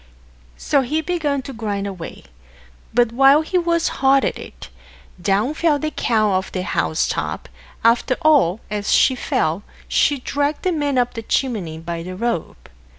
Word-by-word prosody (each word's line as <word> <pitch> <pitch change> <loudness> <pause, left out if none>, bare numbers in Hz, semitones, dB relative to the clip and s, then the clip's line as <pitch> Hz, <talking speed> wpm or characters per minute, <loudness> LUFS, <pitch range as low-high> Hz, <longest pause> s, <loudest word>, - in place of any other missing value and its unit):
So 280 - +1
he 295 +5 -1
began 300 -5 -1
to 270 - -8
grind 205 -4 -3
away; 185 -4 -7 0.7
but 240 -1 +2
while 275 +5 +5
he 360 +3 0
was 335 -1 +1
hard 270 0 +4
at - - -2
it, - - -11 0.5
down 205 +9 +1
fell 310 -1 +2
the 310 +2 -3
cow 215 -7 +1
off 190 0 -1
the 185 - -3
house 80 - 0
top - - -3 0.4
after 235 +2 +3
all, 260 - +4
and 210 - -1
as 205 - -2
she 265 - +5
fell, 170 -8 -1 0.3
she 290 - +2
dragged 285 +3 -2
the 370 - +1
man 290 -5 -1
up 245 0 +1
the 230 - -5
chimney 215 - -2
by 165 +1 -5
the 185 +2 -7
rope. 230 -4 -3
245 Hz, 170 wpm, -20 LUFS, 200-290 Hz, 0.7 s, while